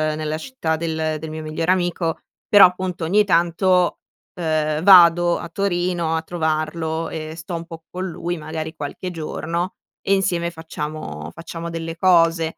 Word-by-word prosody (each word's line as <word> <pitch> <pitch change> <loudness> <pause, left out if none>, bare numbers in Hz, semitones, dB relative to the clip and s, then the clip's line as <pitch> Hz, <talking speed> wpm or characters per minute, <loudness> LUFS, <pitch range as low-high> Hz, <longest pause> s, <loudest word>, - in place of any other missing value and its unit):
nella 155 0 -3
città 165 -6 -2
del 160 -1 -2
del 160 +1 -6
mio 155 0 -5
migliore 155 +3 -1
amico, 175 -2 0 0.3
però 205 -2 +9
appunto 180 -1 -4
ogni 205 +6 +4
tanto, 180 0 +2 0.4
uhm, 155 -2 0
vado 175 -2 +7
a 170 - -7
Torino 175 -3 -1
a 160 - 0
trovarlo 160 0 -2
e 155 0 -6
sto 170 +2 -6
un 165 0 -5
po' 165 -1 -10
con 185 +1 -4
lui, 175 0 -4
magari 160 +1 -5
qualche 150 +4 -5
giorno, 170 +2 -3 0.3
e 195 - +1
insieme 175 -3 0
facciamo 150 - -6
facciamo 165 0 -7
delle 165 0 -5
cose. 165 -2 +3
165 Hz, 155 wpm, -21 LUFS, 160-175 Hz, 0.4 s, però